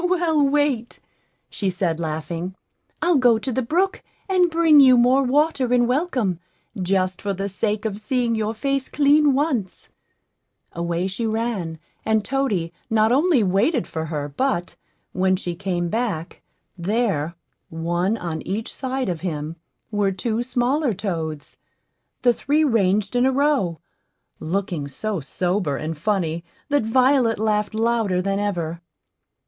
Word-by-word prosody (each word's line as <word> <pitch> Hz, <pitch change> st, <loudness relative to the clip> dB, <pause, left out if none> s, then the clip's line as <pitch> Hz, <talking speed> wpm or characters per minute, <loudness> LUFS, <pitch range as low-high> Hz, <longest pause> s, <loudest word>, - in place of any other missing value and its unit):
"Well, 345 Hz, -4 st, +2 dB
wait," 280 Hz, -4 st, +1 dB, 0.5 s
she 195 Hz, -, -2 dB
said, 180 Hz, -3 st, -1 dB
laughing; 165 Hz, +3 st, -4 dB, 0.5 s
"I'll 345 Hz, -3 st, +4 dB
go 245 Hz, -3 st, +5 dB
to 260 Hz, +4 st, -4 dB
the 260 Hz, -, 0 dB
brook 350 Hz, +10 st, 0 dB, 0.3 s
and 365 Hz, -2 st, +3 dB
bring 325 Hz, -2 st, +5 dB
you 260 Hz, -3 st, +7 dB
more 250 Hz, +3 st, +5 dB
water 275 Hz, -1 st, +1 dB
in 245 Hz, -1 st, +4 dB
welcome, 250 Hz, -, 0 dB, 0.4 s
just 185 Hz, -1 st, 0 dB
for 200 Hz, -1 st, -1 dB
the 195 Hz, +2 st, -3 dB
sake 210 Hz, +2 st, -2 dB
of 210 Hz, -2 st, -2 dB
seeing 240 Hz, +2 st, 0 dB
your 220 Hz, 0 st, -1 dB
face 275 Hz, +3 st, -1 dB
clean 295 Hz, 0 st, +4 dB
once." 265 Hz, -, -2 dB, 0.8 s
Away 170 Hz, +1 st, -2 dB
she 195 Hz, +4 st, -2 dB
ran, 220 Hz, -7 st, -2 dB, 0.3 s
and 220 Hz, -1 st, +1 dB
toady 215 Hz, -12 st, -1 dB, 0.2 s
not 220 Hz, 0 st, +3 dB
only 285 Hz, -2 st, +4 dB
waited 210 Hz, -, +2 dB
for 160 Hz, 0 st, -4 dB
her, 150 Hz, -2 st, -3 dB
but, 175 Hz, -, -1 dB, 0.4 s
when 185 Hz, +1 st, +2 dB
she 180 Hz, -2 st, -4 dB
came 175 Hz, -1 st, -2 dB
back, 195 Hz, -5 st, -3 dB, 0.3 s
there, 185 Hz, -4 st, -1 dB, 0.3 s
one 175 Hz, +6 st, -1 dB
on 165 Hz, -5 st, -4 dB
each 215 Hz, +4 st, -4 dB
side 260 Hz, -1 st, -3 dB
of 175 Hz, -4 st, -3 dB
him, 155 Hz, -3 st, -4 dB, 0.4 s
were 205 Hz, -2 st, +1 dB
two 225 Hz, +4 st, -2 dB
smaller 250 Hz, +1 st, 0 dB
toads 160 Hz, -6 st, -4 dB, 0.6 s
the 245 Hz, -1 st, +5 dB
three 295 Hz, +6 st, +1 dB
ranged 210 Hz, -5 st, +1 dB
in 245 Hz, -, +3 dB
a -, -, +3 dB
row, 265 Hz, -, +1 dB, 0.6 s
looking 175 Hz, -4 st, -2 dB
so 200 Hz, +8 st, -3 dB
sober 175 Hz, 0 st, -1 dB
and 155 Hz, +3 st, -4 dB
funny 170 Hz, -1 st, -1 dB, 0.3 s
that 290 Hz, 0 st, +3 dB
Violet 250 Hz, +1 st, +3 dB
laughed 210 Hz, 0 st, 0 dB
louder 225 Hz, -4 st, +1 dB
than 195 Hz, +2 st, -1 dB
ever. 170 Hz, -5 st, -2 dB
215 Hz, 145 wpm, -22 LUFS, 180-260 Hz, 0.8 s, you